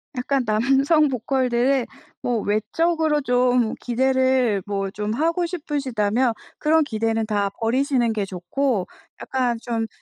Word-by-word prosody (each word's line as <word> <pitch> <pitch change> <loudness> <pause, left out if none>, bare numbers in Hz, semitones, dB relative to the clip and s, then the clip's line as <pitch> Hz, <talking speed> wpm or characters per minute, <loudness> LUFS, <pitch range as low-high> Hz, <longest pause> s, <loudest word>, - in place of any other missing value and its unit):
약간 255 +1 0
남성 270 +8 +3
보컬들을 255 0 +1 0.3
뭐 240 -2 0
외적으로 310 +9 0
좀 245 -3 +2
기대를 260 -3 +1
뭐 195 -1 -2
좀 210 +1 -3
하고 330 +7 0
싶으시다면 260 - -1 0.3
그런 315 +1 +3
기대는 225 -3 -1
다 205 -2 0
버리시는 245 0 +1
게 210 -2 -1
좋고 195 +4 -2 0.3
약간 250 -3 -1
좀 225 -2 -2
250 Hz, 250 characters per minute, -22 LUFS, 220-275 Hz, 0.3 s, 남성